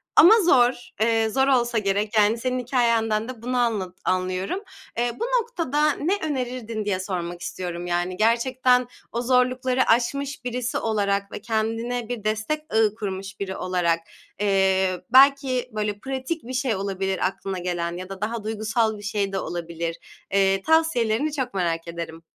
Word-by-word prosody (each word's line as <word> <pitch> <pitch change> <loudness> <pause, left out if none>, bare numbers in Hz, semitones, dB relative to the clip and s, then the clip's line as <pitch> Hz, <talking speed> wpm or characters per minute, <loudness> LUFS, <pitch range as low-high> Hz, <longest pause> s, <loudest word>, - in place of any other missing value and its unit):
Ama 360 - +9
zor, 245 -8 +3
eee, 225 0 +3
zor 265 +4 +2
olsa 240 -3 +2
gerek. 205 +1 0
Yani, 215 +2 +4
senin 255 +1 -1
hikâyenden 230 -3 +1
de 250 -4 -8
bunu 250 +2 -2
anla 215 -7 0
anlıyorum. 185 - -1 0.3
Eee, 240 +1 +1
bu 465 - 0 0.2
noktada 305 - 0
ne 335 +7 0
önerirdin 250 -7 -3
diye 195 -3 0
sormak 175 -2 -4
istiyorum. 175 0 -5
Yani, 175 +1 -1
gerçekten 250 +3 +3 0.2
o 235 - -2
zorlukları 255 +1 +2
aşmış 275 +4 +1
birisi 245 0 -2
olarak 200 -2 0
ve - - -6
kendine 225 +1 -2
bir 240 -4 -4
destek 215 +8 -1
ağı 220 -1 +3
kurmuş 195 -2 -5
biri 190 -1 -3
olarak, 175 -2 +1 0.4
eee, 190 -2 +2
belki 270 -1 +5
böyle 210 -1 -2
pratik 270 +5 -4
bir 255 - -7
şey 255 -3 0
olabilir 195 0 -2
aklına 190 0 -5
gelen 175 -1 -2
ya 185 +1 -7
da 195 0 -8
daha 220 +1 -2
duygusal 220 0 0
bir 205 - -11
şey 205 -1 -1
de 195 - 0
olabilir. 170 -1 -4 0.4
Eee, 195 -1 +3
tavsiyelerini 300 -3 +2
çok 260 -6 -2
merak 170 -3 -1
ederim. 165 -1 -7
220 Hz, 155 wpm, -24 LUFS, 195-250 Hz, 0.4 s, Ama